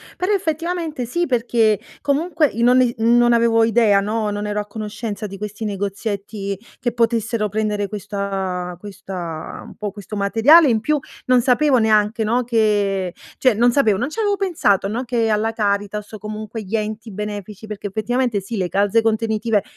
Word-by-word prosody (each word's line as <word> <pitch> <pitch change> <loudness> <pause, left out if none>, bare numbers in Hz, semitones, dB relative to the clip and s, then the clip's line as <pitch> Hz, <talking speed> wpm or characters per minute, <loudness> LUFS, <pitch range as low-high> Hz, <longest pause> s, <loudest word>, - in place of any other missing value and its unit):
Però, 365 +3 -1
effettivamente 330 -6 -2
sì, 345 +9 -1
perché 230 - +2 0.2
comunque 305 +2 +1
i 230 - -3
noni 250 0 +4
non 240 +1 +4
avevo 230 -1 +4
idea, 225 -3 +4
no, 215 +1 -1
non 205 0 -3
ero 210 0 -1
a - - -8
conoscenza 210 0 -5
di 195 0 -9
questi 210 +2 -5
negozietti 200 0 -3 0.2
che 240 -1 -1
potessero 230 -2 0
prendere 210 -1 -1
questa 195 -3 -4
questa 185 -5 -7
un - - -12
po' 210 -2 -4
questo 205 +1 -8
materiale, 230 +11 +5
in 225 -2 +2
più 300 +7 +1 0.3
non 255 -1 +4
sapevo 255 +2 +3
neanche, 220 0 +2
no, 235 +3 +1
che 205 -5 +1 0.2
cioè, 255 -2 +4
non 240 +2 +3
sapevo, 220 -8 +3
non 250 +7 -2
ci 310 - -7
avevo 410 -2 +1
pensato, 315 - +1
no, 230 +5 -2
che 235 -2 0
alla 220 +1 +1
Caritas, 205 -1 -1
o - - -5
comunque 215 +2 -6
gli 210 +2 -2
enti 215 +1 -4
benefici 210 +1 -6
perché, 210 -1 -5
effettivamente 225 +2 0
sì, 200 +4 -6
le 185 -4 -1
calze 205 +4 +2
contenitive, 220 -1 0
220 Hz, 170 wpm, -20 LUFS, 205-240 Hz, 0.3 s, materiale